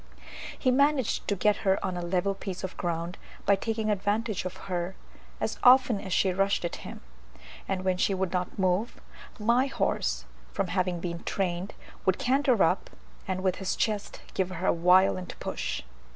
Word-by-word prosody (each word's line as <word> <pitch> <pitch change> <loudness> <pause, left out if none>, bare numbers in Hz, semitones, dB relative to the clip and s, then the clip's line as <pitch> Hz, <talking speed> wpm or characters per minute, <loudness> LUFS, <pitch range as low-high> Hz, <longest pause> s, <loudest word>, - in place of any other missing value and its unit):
He 255 - +2
managed 280 -2 +2
to 200 - +1
get 210 +2 +2
her 195 -2 +2
on 185 - -2
a 175 - -3
level 180 +3 0
piece 195 -2 -6
of 190 - -4
ground, 170 +1 -3 0.3
by 200 - +5
taking 220 +1 -1
advantage 205 0 -1
of 185 +1 -5
her 180 0 -2 0.4
as - - -2
often 250 -4 +6
as 190 - -7
she 185 +1 +3
rushed 195 -1 +1
at 170 - -3
him; - - -9 0.7
and 190 -1 -2
when 185 -1 +2
she 195 +1 +2
would 190 -1 -1
not 180 -1 -2
move, 190 +4 0 0.4
my 235 +4 +3
horse, - - -1 0.3
from 195 -3 -1
having 180 -1 0
been 170 -1 -4
trained, 185 0 -2 0.3
would 190 - +2
canter 260 -3 +3
up, 180 +3 +1 0.4
and 185 0 -2
with 185 -1 +1
his 190 -1 -2
chest 210 -2 -2
give 190 -1 0
her 185 0 -4
a - - +4
violent 180 +1 +3
push. - - -3
190 Hz, 175 wpm, -28 LUFS, 180-210 Hz, 0.7 s, often